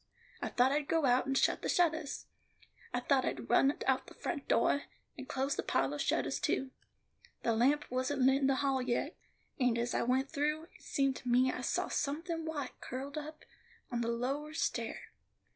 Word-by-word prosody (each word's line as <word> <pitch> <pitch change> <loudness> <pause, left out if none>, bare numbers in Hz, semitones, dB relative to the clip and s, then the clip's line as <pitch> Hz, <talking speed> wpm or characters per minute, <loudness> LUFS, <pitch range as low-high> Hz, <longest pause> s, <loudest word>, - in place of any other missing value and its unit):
I - - -2
thought 250 +2 +3
I'd 290 0 0
go 325 -1 +2
out 255 +1 +3
and 270 0 +1
shut - - +2
the - - -2
shuttahs; 320 -4 +1 0.7
I 245 - -1
thought 265 +1 +3
I'd 125 -3 -3
run 275 - +6
out 265 -1 +1
the - - -13
front 285 -5 -4
doah, 280 +4 +3 0.3
and 265 -1 -9
close 270 +1 0
the - - -1
pahlor 135 +2 0
shuttahs 135 -1 0
too. 265 0 0 0.7
The 230 - +2
lamp 280 +6 +3
wasn't 260 +2 0
lit 265 +2 +4
in 270 - +3
the 270 - +3
hall 270 -1 +2
yet, 250 +5 -1 0.4
and 250 -3 +3
as 235 +1 -1
I - - +1
went 260 +3 +1
through, 300 +1 0
it - - -19
seemed 275 -1 0
to 250 - -6
me 255 +2 +4
I 255 - -5
saw - - 0
somethin' 325 +3 -2
white 295 -5 -5
curled 270 +3 -5
up 305 +1 -9 0.5
on 240 -1 -1
the 230 - -1
lower 275 +6 -2
stair. - - -2
270 Hz, 195 wpm, -33 LUFS, 250-290 Hz, 0.7 s, run